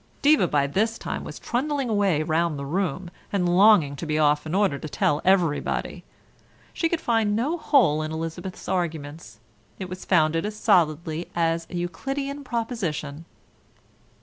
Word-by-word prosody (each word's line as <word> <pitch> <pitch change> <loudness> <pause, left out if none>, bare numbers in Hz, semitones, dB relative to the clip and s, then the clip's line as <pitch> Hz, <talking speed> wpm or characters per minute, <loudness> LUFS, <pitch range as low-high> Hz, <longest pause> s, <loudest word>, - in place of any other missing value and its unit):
Diva 285 -10 +5
by 145 -3 +1
this 220 +10 0
time - - -5
was - - -8
trundling 275 +2 -2
away 200 -8 +1
round 160 0 0
the 140 - -5
room, 175 +2 -2 0.2
and 185 -3 +1
longing 190 -8 +5
to 165 - -6
be 155 0 0
off 150 0 +2
in 160 - -2
order 195 -9 +2
to 155 - -7
tell 145 +1 0
everybody. 180 -6 0 0.7
She 330 - 0
could 340 - -1
find 225 -5 +1
no 270 +10 0
hole 260 - +3
in 155 0 -4
Elizabeth's 165 +3 -6
arguments; 155 - -4 0.4
it 190 -2 -6
was 185 +1 -7
founded 165 -2 +2
as 210 0 -4
solidly 170 -5 +1
as 165 0 0
a - - -7
Euclidean 275 +11 -4
proposition. 190 - -4
175 Hz, 155 wpm, -24 LUFS, 155-215 Hz, 0.7 s, Diva